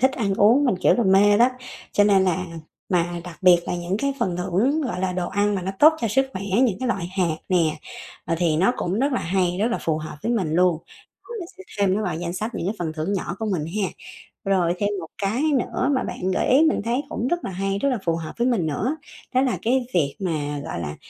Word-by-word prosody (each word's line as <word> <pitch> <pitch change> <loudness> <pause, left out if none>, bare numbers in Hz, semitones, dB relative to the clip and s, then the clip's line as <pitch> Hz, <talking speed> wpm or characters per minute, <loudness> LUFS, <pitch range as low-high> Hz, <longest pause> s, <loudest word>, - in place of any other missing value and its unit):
thích 265 +2 +4
ăn 200 -7 -1
uống, 225 +8 +5
mình 250 - +2
kiểu - - +4
là 240 - +1
mê 205 +2 +5
đó, 240 +2 +6 0.4
cho 205 - +4
nên 200 -2 +4
là 185 0 0 0.4
mà 175 -1 0
đặc 175 -4 -10
biệt 180 -1 +7
là - - -2
những 175 +2 -2
cái 280 +3 0
phần 180 -2 -1
thưởng 200 - +1
gọi 205 -10 -3
là 185 -1 0
đồ 180 -1 -2
ăn 205 +1 +1
mà 185 - -2
nó 190 - -2
tốt 310 +2 +8
cho 230 - 0
sức 265 +6 +2
khỏe, 190 - -5 0.2
những 215 -7 +1
cái 255 - -1
loại 195 -8 -1
hạt 170 -4 +1
nè, 165 -4 +2 0.5
ờ, 165 - -1
thì 165 -3 +2
nó 190 +8 +3
cũng 180 +4 -2
rất 275 +3 +1
là 250 - 0
hay, 180 0 0
rất 210 - +2
là 235 - -1
phù 160 -1 -1
hợp 155 -1 -7
với 230 - 0
mình 180 -9 0
luôn. 180 -2 +3 0.6
Mình 345 - -6
sẽ 385 - -11 0.2
thêm 195 -2 +3
nó 215 - -1
vào 180 - -2
danh 170 0 -4
sách 215 +6 -4
những 170 - -3
cái 205 - -1
phần 160 -3 -3
thưởng 155 +5 -3
nhỏ 185 -2 -3
của 220 - -3
mình 160 -5 -1 0.2
ha. 190 - +1 0.6
Rồi 185 -3 +2
thêm 205 +1 0
một 165 - -7
cái 210 +7 0 0.2
nữa 255 +2 -1
mà 260 - 0
bạn 185 +1 -3
gợi - - 0
ý 265 +4 +6
mình - - -1
thấy 235 +4 0
cũng 240 - -2
rất 345 +5 -1
là - - -4
hay, 195 +2 -2
rất 280 - +1
là 255 - 0
phù 165 -1 +2
hợp 165 -1 -6
với 240 +1 +1
mình 225 -10 +1
nữa, 220 - -1 0.4
đó 255 - +4
là 260 -3 +1
cái 250 +2 +1
việc 145 -6 +1
mà 150 -5 -2
gọi - - -5
là, 75 -2 -5
190 Hz, 260 wpm, -23 LUFS, 175-235 Hz, 0.6 s, tốt